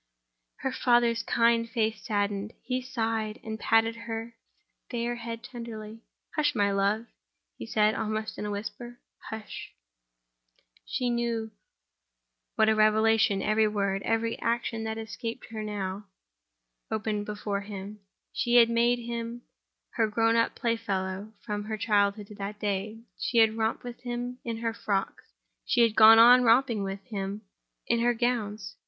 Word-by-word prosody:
Her 265 - -1
father's 240 -2 +3
kind 230 +1 +2
face 220 -2 -1
saddened; 205 -2 -1
he 255 0 -2
sighed, 225 -4 -2
and 220 0 -5
patted 225 +1 +3
her 225 +1 -4 0.6
fair 240 0 -2
head 230 0 -6
tenderly. 225 -3 -8 0.3
"Hush, 295 -2 +1
my 200 -2 +2
love," 200 +3 +1 0.5
he - - -8
said, 215 -1 +3
almost 215 0 -3
in - - -3
a - - -3
whisper; 220 +4 -6 0.3
"hush!" 220 -1 -8 1.1
She - - -3
little 240 -1 +1
knew 230 -2 -2 1.0
what 220 - +4
a 220 - +5
revelation 215 -1 +3
every 215 +1 +3
word, 200 -2 -1
every 230 +1 -1
action 230 -1 -1
that 220 0 -3
escaped 225 +1 -6
her, 220 -1 -4
now 205 -1 -4 0.8
opened 210 -1 -2
before 205 -1 -3
him. 200 +1 -8 0.3
She 240 0 +1
had 235 -1 +7
made 235 +1 +3
him 235 0 -5 0.5
her 225 -2 +3
grown 225 +2 +2
up 230 0 +2
playfellow, 205 -4 -2
from 210 -2 -3
her 215 0 -3
childhood 205 -1 +1
to 210 - -12
that 205 +1 -5
day. 210 +2 -3 0.2
She 240 - -1
had 220 -1 +5
romped 225 0 -1
with 245 -1 -7
him 245 0 -4
in 230 -1 -3
her 225 - 0
frocks, 200 -3 -2 0.4
she 245 - +2
had 230 -2 +4
gone 225 0 +9
on 245 +2 +9
romping 235 -2 +4
with 195 0 -4
him 200 0 -5 0.4
in 235 - +1
her 240 +1 +2
gowns. 225 -3 -2
225 Hz, 150 wpm, -28 LUFS, 210-235 Hz, 1.1 s, gone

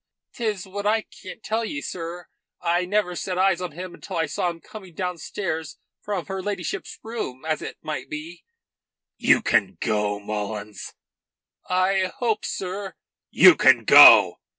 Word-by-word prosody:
"'Tis 215 -5 -3
what 200 +2 -5
I 220 +1 +2
can't 190 +4 -13
tell 225 +2 -1
ye, 295 +7 -4
sir. 175 - -7 0.3
I 175 +1 0
never 185 -2 -1
set 185 +1 -4
eyes 185 -1 +2
on 180 -4 -5
him 180 +2 -8
until - - -7
I 165 - +1
saw 160 +4 -2
him 170 -1 -7
coming 190 -2 -13
downstairs 170 -2 -4 0.2
from 200 -5 -4
her 190 -1 -5
ladyship's 190 -3 -5
room 190 - -6
as 155 -1 -1
it - - -7
might 155 - -5
be." 160 +3 -8 0.7
"You - - +3
can 95 -6 +1
go, 105 -1 -1
Mullins." 105 0 -6 0.7
"I 185 0 +1
hope, 225 -3 -1
sir 190 +1 -5 0.2
" - - -69
"You - - +10
can - - +4
go." - - +8
180 Hz, 155 wpm, -23 LUFS, 160-200 Hz, 0.7 s, You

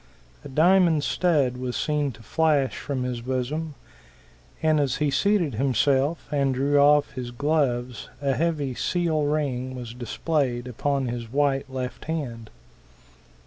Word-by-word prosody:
A - - -9
diamond 165 +1 +4
stud 145 -10 +1
was 125 -1 -4
seen 150 -2 0
to 115 - -15
flash 150 0 +1
from 135 -3 -3
his 125 -2 -3
bosom; 130 +5 -3 0.9
and 155 -1 +3
as 135 -3 +1
he 150 -2 0
seated 195 - +2
himself 135 +5 +1
and 140 -3 +1
drew 140 +2 +2
off 145 +1 +5
his 125 -2 -5
gloves 125 -2 -1
a 140 -1 0
heavy 150 -4 -1
seal 160 +1 0
ring 130 -4 -1
was 120 -2 -7
displayed 125 +1 -2
upon 135 +3 -1
his 120 -1 -5
white 140 0 +1
left 130 -1 -5
hand. 125 -9 -4
140 Hz, 140 wpm, -25 LUFS, 125-150 Hz, 0.9 s, off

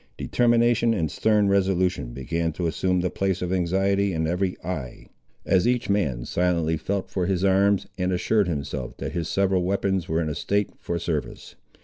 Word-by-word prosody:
Determination 120 -1 +2
and 80 -7 -1
stern 105 -2 +2
resolution 95 -8 +1
began 80 +6 -2
to 85 - -3
assume 90 +2 0
the 90 - -1
place 95 -2 -1
of 90 +1 -2
anxiety 95 +2 +1
in 80 0 -1
every 90 +3 -1
eye, 75 -8 -5 0.4
as 95 +3 +3
each 120 -4 +1
man 70 -13 0
silently 85 -2 +1
felt 100 +4 -3
for 90 -2 -1
his 95 -1 0
arms, 100 +1 +3
and 90 0 0
assured 100 +3 +1
himself, 70 -6 -4
that - - -4
his 85 -2 -3
several 95 -1 +2
weapons 95 -1 -1
were 80 +1 +1
in 80 - -1
a 75 - -2
state 100 +6 -1
for 85 - -3
service. 75 -7 -4
90 Hz, 175 wpm, -24 LUFS, 85-100 Hz, 0.4 s, as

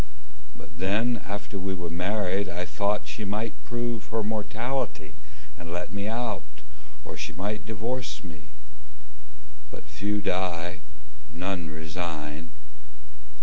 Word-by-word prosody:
But 85 - -10
then 110 +5 +4
after 100 0 -2
we 95 0 +1
were 85 -2 -2
married 95 +2 +3
I 90 +1 0
thought 100 +4 +2
She 110 - -2
might 105 +2 +1
prove 120 -2 0
her 110 -1 +2
mortality 110 - 0 0.4
and 85 -1 -6
let 90 +2 -1
me 100 0 +1
out, 115 +1 +1 0.6
Or - - -4
she - - -2
might 105 +2 -1
divorce 115 +4 0
me. 75 -4 -8 1.2
But - - -7
few 105 0 +1
die, 90 -2 +2 0.5
none 90 -1 0
resign. 80 0 -2
100 Hz, 120 wpm, -30 LUFS, 85-110 Hz, 1.2 s, then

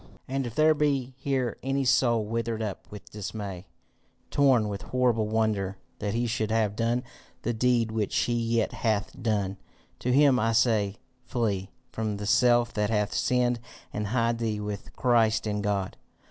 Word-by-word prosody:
"And 135 -1 -2
if 115 - -8
there 155 0 +5
be 140 -4 0
here 135 -3 -1
any 135 +1 0
soul 120 -3 +3
withered 115 0 -2
up 105 -3 -5
with 105 -1 -11
dismay, 100 -3 -6 0.6
torn 130 -6 +4
with 100 -1 -4
horrible 120 -4 +1
wonder 105 -3 0 0.2
that 105 +1 -2
he 120 +1 +1
should 110 -2 -1
have 110 -2 +1
done 120 +2 0 0.4
the 120 - 0
deed 115 -1 +2
which 110 -2 -1
he 120 - +1
yet 115 -1 +1
hath 110 -3 0
done, 100 -4 0 0.4
to 125 - -1
him 135 -1 +5
I 115 0 +1
say 110 -3 +2 0.3
Flee 105 -6 -1 0.2
from 110 -2 -2
the 105 - -5
self 120 +2 +4
that 105 -1 0
hath 105 -2 0
sinned 125 -1 +1 0.3
and 105 0 -2
hide 115 +1 +1
thee 110 -2 -1
with 105 -1 -5
Christ 115 -4 +3
in 105 -1 -1
God. 100 -2 -1
115 Hz, 165 wpm, -27 LUFS, 105-125 Hz, 0.6 s, there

